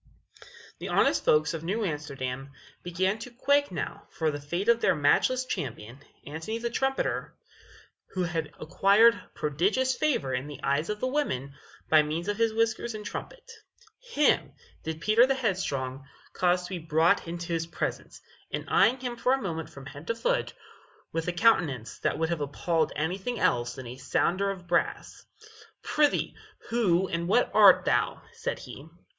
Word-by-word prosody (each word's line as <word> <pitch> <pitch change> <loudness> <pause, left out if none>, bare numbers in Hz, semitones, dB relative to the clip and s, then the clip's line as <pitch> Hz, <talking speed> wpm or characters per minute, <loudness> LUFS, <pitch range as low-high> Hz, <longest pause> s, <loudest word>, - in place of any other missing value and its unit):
The - - -5
honest - - +2
folks 150 +1 +3
of 165 -1 -5
New 205 +6 -1
Amsterdam 140 -4 -4 0.3
began 190 +4 -1
to 235 - -7
quake 285 +3 +1
now 180 - -5
for 160 -2 -1
the 145 0 -6
fate 170 +8 -3
of 235 0 +4
their - - +3
matchless 205 - +2
champion, 120 - -5 0.3
Antony 160 +9 -4
the 235 0 -3
Trumpeter, 270 +2 -1 0.8
who 185 - 0
had 165 -3 -2
acquired 200 +8 +4
prodigious 195 - +1
favor 250 - 0
in 125 +3 -2
the 150 - -8
eyes 140 +4 0
of 210 0 -3
the 255 - +1
women 140 - -2 0.3
by 155 -1 +6
means 155 +4 -3
of 205 0 -1
his 230 -1 +2
whiskers 225 +1 0
and 210 -1 -7
his - - -5
trumpet. 475 -1 -8 0.5
Him 465 -12 +1 0.3
did 160 0 -5
Peter 220 +6 +5
the 270 - +2
Headstrong 140 - -2 0.3
cause 180 0 +2
to 180 - -7
be 185 -2 -4
brought 165 +4 +2
into 170 0 -4
his 165 0 -1
presence, - - -4 0.3
and - - -4
eying 250 +4 +4
him 245 -1 -4
for 250 +2 +2
a - - +3
moment 165 -7 -4
from 135 -1 -12
head 145 +3 -10
to 230 - 0
foot, - - 0 0.6
with 165 +1 -3
a - - +1
countenance 170 - +2
that - - 0
would 160 +1 0
have 170 -3 -2
appalled 160 +3 0
anything 190 +9 -2
else 120 0 +1
than 130 - -8
a 120 +2 -8
sounder 185 +9 0
of 190 -2 -6
brass 175 0 -1 0.6
"Pr'ythee, 295 -1 +1 0.4
who 190 -6 +2
and 170 -1 -2
what 240 +6 +3
art 200 -4 +7
thou?" - - +1
said - - -3
he. 145 +5 -10
175 Hz, 170 wpm, -28 LUFS, 150-230 Hz, 0.8 s, art